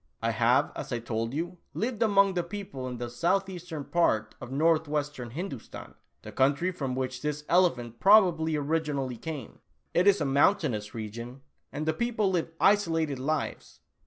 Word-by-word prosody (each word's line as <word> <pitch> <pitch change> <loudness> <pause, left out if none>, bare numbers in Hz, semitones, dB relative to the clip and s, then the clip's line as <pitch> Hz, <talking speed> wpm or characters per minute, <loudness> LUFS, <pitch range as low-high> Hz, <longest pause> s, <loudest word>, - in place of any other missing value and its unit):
I - - 0
have, - - +3
as - - -6
I 120 - 0
told 115 0 -3
you, 170 +5 -4 0.2
lived 230 0 -2
among 200 -3 +4
the 180 - +1
people 170 -8 -6
in 125 -1 -5
the 120 0 -4
southeastern 175 +3 -2
part 110 -11 +1
of 125 -1 -8
northwestern 150 -3 0
Hindoostan, 140 - -7 0.3
the - - -8
country 145 +7 +2
from 135 -7 -3
which 130 -1 -3
this 150 0 -3
elephant 125 -11 +2
probably 175 - +5
originally 145 -4 -1
came. 150 -4 -7 0.3
It 180 +3 +3
is 200 0 +5
a 150 - 0
mountainous 135 - +2
region, 115 +4 -7 0.3
and 150 +2 -4
the 160 - +1
people 220 0 0
live 170 -3 0
isolated 165 -8 +2
lives. 155 +4 -3
155 Hz, 160 wpm, -28 LUFS, 130-180 Hz, 0.3 s, probably